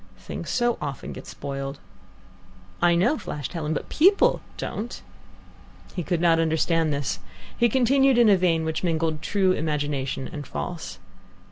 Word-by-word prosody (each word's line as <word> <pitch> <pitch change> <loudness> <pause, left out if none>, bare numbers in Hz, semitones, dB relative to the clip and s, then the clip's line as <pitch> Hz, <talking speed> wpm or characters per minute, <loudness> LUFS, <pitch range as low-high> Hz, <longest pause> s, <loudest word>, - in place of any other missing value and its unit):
"Things 95 - -7
so 240 -1 +1
often 140 -3 -5
get - - -10
spoiled." 135 0 -5 1.0
"I 175 0 +5
know," 240 - +2
flashed 145 +1 -5
Helen, 155 -3 -3
"but - - -4
people 380 +6 +4 0.2
don't." 230 +3 -4 1.0
He 180 - -1
could 175 0 -1
not 165 -1 +4
understand 160 0 +2
this. 140 -1 -2 0.4
He 240 0 +3
continued 265 +2 +4
in 240 -2 +6
a 205 - +7
vein 170 -3 +2
which 160 +2 -2
mingled 160 -2 0
true 190 +1 +2
imagination 145 -5 -2
and 145 -5 -7
false. 75 0 -5
165 Hz, 145 wpm, -25 LUFS, 150-205 Hz, 1.0 s, a